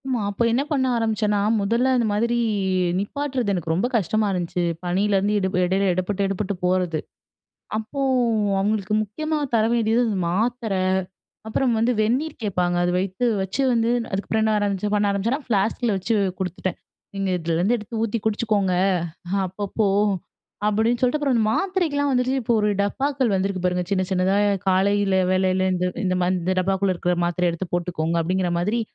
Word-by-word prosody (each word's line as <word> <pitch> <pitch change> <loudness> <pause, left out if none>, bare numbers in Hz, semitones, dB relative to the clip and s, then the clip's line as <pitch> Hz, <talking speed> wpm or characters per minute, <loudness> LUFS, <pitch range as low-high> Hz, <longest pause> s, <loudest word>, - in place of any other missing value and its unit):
ஆமா. 250 -4 0
அப்ப 200 +3 -5
என்ன 240 +4 +2
பண்ண 270 -3 +2
ஆரம்பிச்சேன்னா, 215 -2 0 0.2
மொதல்ல 230 +6 +1
அந்த 235 - +1
மாதிரி 235 +3 +1 0.6
நிப்பாட்றது, 255 +1 -2
எனக்கு 170 -3 -2
ரொம்ப 185 +8 +1
கஷ்டமா 215 +2 0
இருந்துச்சு. 180 -1 -2 0.2
பனிலருந்து 195 +3 +1
எட 190 - 0 0.2
எடையில 190 +2 +1
எடப்பட்டு 185 +2 -1
எடபட்டு 195 +1 -2
போறது. 180 -3 +1 0.8
அப்போ 220 +6 -4 0.6
அவங்களுக்கு 210 +1 0
முக்கியமா 310 +9 -3 0.2
தர 220 -1 +4
வேண்டியது 230 0 +2
வந்து, 215 -4 -1
மாத்திர 225 +3 -1 0.7
அப்புறம் 240 +2 +1
வந்து 230 +3 +2
வெந்நீர் 250 +8 0
கேட்பாங்க. 180 -4 0
அது 175 - +1
வைத்து, 190 +4 -2 0.2
வச்சு 190 +8 -2
வந்து 230 0 +2 0.2
அதுக்கப்புறம் 205 +3 -1
என்ன 220 0 +2
ஆரம்பிச்சு, 205 0 -1
பண்ண 205 -1 +2
ஆரம்பிச்சேன்னா 220 +8 -1
ஃப்ளாஸ்கில 220 +1 0
வெச்சு 190 +5 -1 0.3
குடுத்துட்டேன். 185 0 -3 0.4
"நீங்க 195 -1 -2
இதுலருந்து 170 +6 +1
எடுத்து 220 0 -6
ஊத்தி 230 0 -1
குடிச்சுக்கோங்க 210 -3 +1 0.7
அப்பப்போ" 200 +3 -2 0.8
அப்படீன்னு 220 +3 +1
சொல்லிட்டு. 255 +4 +2
அப்புறம் 280 -3 +1
அந்த 225 - +2
மாத்திரைக்கில்லாம் 340 -7 0
வந்துட்டு, 250 0 +1
இப்போ 235 +1 +1
ஒரு 210 - +2
டப்பாக்கள் 265 +3 0
வந்திருக்கு 190 -1 -1
பாருங்க. 180 0 0
சின்ன, 190 -1 +1
சின்னதா 190 +1 +2 0.3
காலையில 195 +1 +2 0.2
வேளையில 185 0 +2
"இந்த 180 0 -1 0.2
இந்த 185 -1 +1 0.3
இந்த 185 +2 0
டப்பாக்குள்ள 190 0 +1
இருக்கிற 180 +1 0
மாத்திரைய 175 0 +1
எடுத்து 175 +2 -5
போட்டுக்கோங்க" 170 -2 -1
அப்படீங்கிற 180 +1 0
மாதிரி, 210 +7 0
205 Hz, 150 wpm, -23 LUFS, 185-230 Hz, 0.8 s, தர